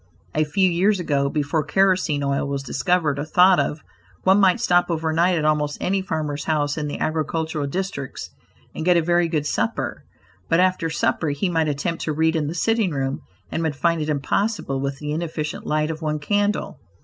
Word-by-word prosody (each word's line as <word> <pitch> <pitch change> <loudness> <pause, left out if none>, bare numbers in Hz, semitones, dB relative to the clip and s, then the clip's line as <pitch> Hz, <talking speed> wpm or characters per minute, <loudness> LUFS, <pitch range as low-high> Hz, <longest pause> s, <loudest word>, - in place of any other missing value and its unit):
A 155 0 +2
few 185 +6 +2
years 185 +3 +2
ago, 140 -5 0
before 150 +1 0
kerosene 185 -4 +2
oil 140 0 0
was 140 -1 -3
discovered 155 +1 0
or - - -1
thought 180 +4 +5
of, 155 - -2 0.4
one 190 +2 +5
might 190 -2 +4
stop 175 0 +2
overnight 165 +2 +1
at 155 - -1
almost 150 -1 +1
any 195 +1 0
farmer's 155 -6 -3
house 145 -2 0
in 150 -2 -3
the 145 - -4
agricultural 155 -1 -2
districts 160 -4 -4 0.4
and - - -5
get 175 +1 +4
a - - +4
very 175 +1 +2
good 155 -3 -1
supper, - - -2 0.5
but 165 - +3
after 185 -3 +2
supper 160 -1 0
he 145 +7 -1
might 165 -2 +1
attempt 150 +4 -2
to 155 - -1
read 160 +2 +1
in 155 -2 0
the 160 - -4
sitting 225 +2 +1
room, 135 -3 -2 0.3
and 160 - -2
would 160 -3 -1
find 165 +2 +1
it 155 - -2
impossible 150 +1 -1
with 140 0 -3
the 150 +1 -5
inefficient 155 -1 -4
light 155 +1 0
of 160 0 -7
one 155 -1 -1
candle. 205 +7 -1
160 Hz, 195 wpm, -22 LUFS, 150-180 Hz, 0.5 s, thought